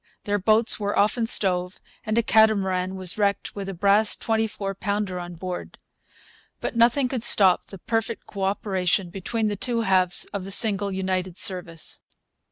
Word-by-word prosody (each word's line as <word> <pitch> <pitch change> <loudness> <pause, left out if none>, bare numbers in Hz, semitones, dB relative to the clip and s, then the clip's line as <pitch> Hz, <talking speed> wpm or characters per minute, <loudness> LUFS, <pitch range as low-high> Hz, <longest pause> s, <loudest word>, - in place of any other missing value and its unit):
Their 205 0 -1
boats 220 +4 +3
were 205 0 -2
often 225 +3 +1
stove, 180 -3 +2 0.3
and 215 +1 -1
a 235 - +3
catamaran 190 -5 +2
was 185 +2 -2
wrecked 200 -1 -1
with 195 -1 -6
a - - -5
brass 205 +4 +4
twenty 225 0 -1
four 195 -2 -5
pounder 200 -2 -3
on 175 0 -8
board. 180 +1 -7 0.8
But - - -5
nothing 240 +3 +3
could 250 -3 -4
stop 195 -6 +4
the 195 - -11
perfect 225 +4 -3
co 195 -2 -4
operation 190 -2 -1
between 215 +4 -3
the 205 - -2
two 235 +3 -2
halves 185 -4 +2
of 200 -2 -4
the 195 - -8
single 200 -1 +3
United 185 -1 -3
Service. 175 -5 0
200 Hz, 170 wpm, -23 LUFS, 185-220 Hz, 0.8 s, brass